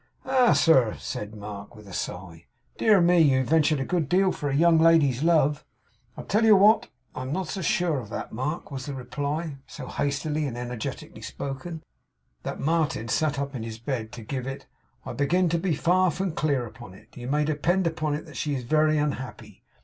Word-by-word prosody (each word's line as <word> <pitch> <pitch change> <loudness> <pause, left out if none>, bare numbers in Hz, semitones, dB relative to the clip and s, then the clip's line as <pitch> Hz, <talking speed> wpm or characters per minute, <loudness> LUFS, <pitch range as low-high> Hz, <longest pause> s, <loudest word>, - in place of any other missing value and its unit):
'Ah, 255 -2 +4
sir!' 130 -9 +4
said 105 +1 -6
Mark, 105 +1 -8
with 105 -1 -14
a 95 - -10
sigh. 85 -3 -6 0.3
'Dear 215 -3 +5
me! 175 0 +4
You've 135 -4 +4
ventured 155 0 +3
a 135 - -2
good 165 -4 -1
deal 190 +2 +3
for 145 - -3
a 135 - -1
young 165 +2 +5
lady's 160 -6 +4
love!' 150 -3 +3 0.5
'I - - -6
tell 215 +3 +1
you 220 -2 +7
what. 210 +3 +5 0.2
I'm 130 +1 -5
not 180 +1 -2
so 195 - -4
sure 165 -2 +1
of 110 -5 -9
that, - - -5
Mark,' 150 +8 -4
was 135 0 -6
the 140 - -4
reply; 140 +4 -4
so 140 - -8
hastily 145 +3 -1
and 120 -3 -5
energetically 120 -2 -6
spoken, 155 +4 -6 0.6
that - - -5
Martin 155 -7 0
sat 150 +1 +1
up 140 0 -3
in 125 - -5
his 110 -1 -6
bed 115 -2 -4
to 115 - -8
give 130 +3 -4
it. 135 0 -6 0.4
'I - - -5
begin 175 +5 +2
to 170 +1 +1
be 170 -2 0
far 185 +4 +3
from 185 +3 -2
clear 145 -5 0
upon 105 -4 -11
it. - - -19
You 120 0 -7
may 150 +2 +1
depend 170 +5 +1
upon 155 -3 -1
it 150 - -8
she 145 -2 -2
is 130 - -4
very 155 +4 +3
unhappy. 145 -4 -4
145 Hz, 200 wpm, -26 LUFS, 130-165 Hz, 0.6 s, you